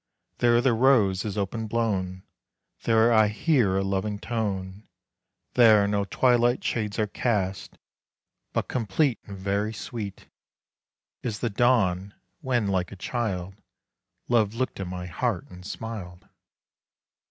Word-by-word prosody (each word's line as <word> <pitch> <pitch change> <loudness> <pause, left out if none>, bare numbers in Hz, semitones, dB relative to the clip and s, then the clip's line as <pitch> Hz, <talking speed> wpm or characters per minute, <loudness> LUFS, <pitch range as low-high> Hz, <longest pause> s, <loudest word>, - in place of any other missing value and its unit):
There 120 0 +4
the 130 -1 +3
rose 110 -6 +3
is 105 -1 -4
open 110 +3 -2
blown, 95 -5 -1 0.6
There 115 +1 +4
I 110 -1 +5
hear 105 - +2
a 95 - +1
loving 100 +2 -1
tone, 100 -3 -4 0.7
There 110 -4 +6
no 100 -1 0
twilight 120 +2 +2
shades 105 -3 -2
are 110 - +2
cast; 100 -3 -2 0.7
But - - -1
complete 120 +3 0
And 100 -2 -8
very 100 +3 -1
sweet 105 -2 -7 0.9
Is 110 -4 -3
the 120 0 -2
dawn, 100 -5 +2 0.2
when, 125 -7 0
like 95 -3 -1
a - - -7
child, 95 -3 -3 0.7
Love 110 -3 +2
looked 130 -2 -2
in 95 - -3
my 90 0 -5
heart 90 +3 -2
and 90 0 -11
smiled. 100 -4 -7
105 Hz, 130 wpm, -26 LUFS, 95-120 Hz, 0.9 s, There